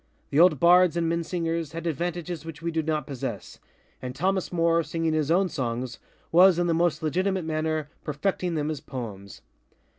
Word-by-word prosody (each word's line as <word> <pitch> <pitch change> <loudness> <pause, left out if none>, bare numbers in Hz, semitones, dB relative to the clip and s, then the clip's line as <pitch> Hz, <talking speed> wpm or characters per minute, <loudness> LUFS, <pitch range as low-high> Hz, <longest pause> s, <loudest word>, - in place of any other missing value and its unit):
The 140 - +2
old 170 -5 +6
Bards 175 +1 +5
and 170 -1 +1
Minnesingers 165 -1 -2
had 165 0 -6
advantages 170 +1 -3
which 165 -2 -8
we 170 +1 -3
do 160 0 0
not 155 -2 -1
possessŌĆöand 125 -9 -6 0.6
Thomas 190 +5 0
Moore, 170 -1 +2
singing 165 +1 -2
his 155 -2 0
own 185 +3 +3
songs, 125 -5 -4 0.3
was, 180 +1 +6
in 175 - +1
the 170 - +1
most 165 -2 +1
legitimate 185 +3 0
manner, 155 -1 -1 0.2
perfecting 175 +3 -2
them 150 0 -1
as 150 - -5
poems. 105 -7 -8
165 Hz, 170 wpm, -26 LUFS, 150-175 Hz, 0.6 s, old